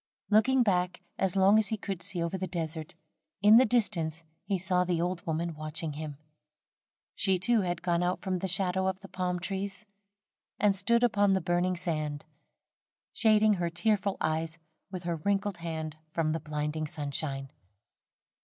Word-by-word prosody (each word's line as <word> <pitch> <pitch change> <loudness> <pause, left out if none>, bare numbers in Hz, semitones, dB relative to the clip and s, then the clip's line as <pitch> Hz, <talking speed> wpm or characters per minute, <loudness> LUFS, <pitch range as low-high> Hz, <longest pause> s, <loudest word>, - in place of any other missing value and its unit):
Looking 245 +5 +5
back, 180 -3 0 0.2
as 190 -1 +2
long 195 +3 +6
as 215 - +2
he 220 - +1
could 195 -3 -5
see 175 -3 0
over 170 +2 -2
the 190 0 -3
desert, 160 -2 -4 0.5
in 210 +2 +9
the 255 - +6
distance 165 -9 0 0.2
he 195 - -1
saw 180 0 +2
the 175 -2 0
old 175 0 -2
woman 165 +1 -1
watching 155 0 -4
him. 150 -1 -6 1.0
She, 190 -2 +1
too, 220 +5 +3
had 175 -2 -3
gone 170 -1 +1
out 180 +1 0
from 185 -2 -2
the 190 - -2
shadow 190 0 0
of 190 0 -1
the 195 - -10
palm 180 -2 -2
trees, 195 +2 -4 0.7
and 205 -2 +3
stood 235 +5 +2
upon 205 -4 +3
the 190 - +2
burning 175 +1 0
sand, 155 -4 -3 0.9
shading 215 -1 +4
her 170 - +1
tearful 200 +3 0
eyes 160 +1 -1 0.3
with 185 -2 -6
her 170 -1 -2
wrinkled 200 +3 -1
hand 160 -2 -5
from 155 -1 0
the 160 - -1
blinding 150 +1 -3
sunshine. 140 -2 -4
180 Hz, 165 wpm, -29 LUFS, 160-195 Hz, 1.0 s, in